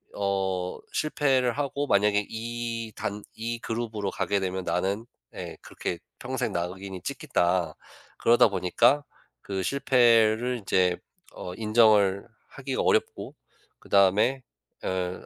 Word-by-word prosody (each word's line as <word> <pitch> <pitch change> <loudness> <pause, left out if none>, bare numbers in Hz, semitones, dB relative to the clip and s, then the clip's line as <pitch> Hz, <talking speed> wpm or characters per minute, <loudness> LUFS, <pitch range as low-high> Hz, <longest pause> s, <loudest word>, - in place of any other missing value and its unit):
어 95 -2 -1 0.2
실패를 135 -5 +1
하고 145 0 -2
만약에 105 -1 +3
이 115 0 -4
단 105 +1 -4
이 115 +1 -4
그룹으로 110 -4 -3
가게 100 +1 0
되면 95 -1 -3
나는' 100 +6 -1 0.3
네 - - -7
그렇게 90 - -5 0.2
'...평생 125 -2 -2
낙인이 95 +2 -4
찍힌다.' 90 - 0 0.4
그러다 120 0 +5
보니까 110 +9 +2 0.4
그 95 -1 -3
실패를 120 -2 +3
인제 90 -3 +2 0.4
어 90 - -7
인정을 105 -3 +3 0.2
하기가 135 -1 -3
어렵고 - - 0 0.4
그다음에 105 +7 +3 0.4
엘 90 -1 -3
105 Hz, 240 characters per minute, -27 LUFS, 95-120 Hz, 0.4 s, 그러다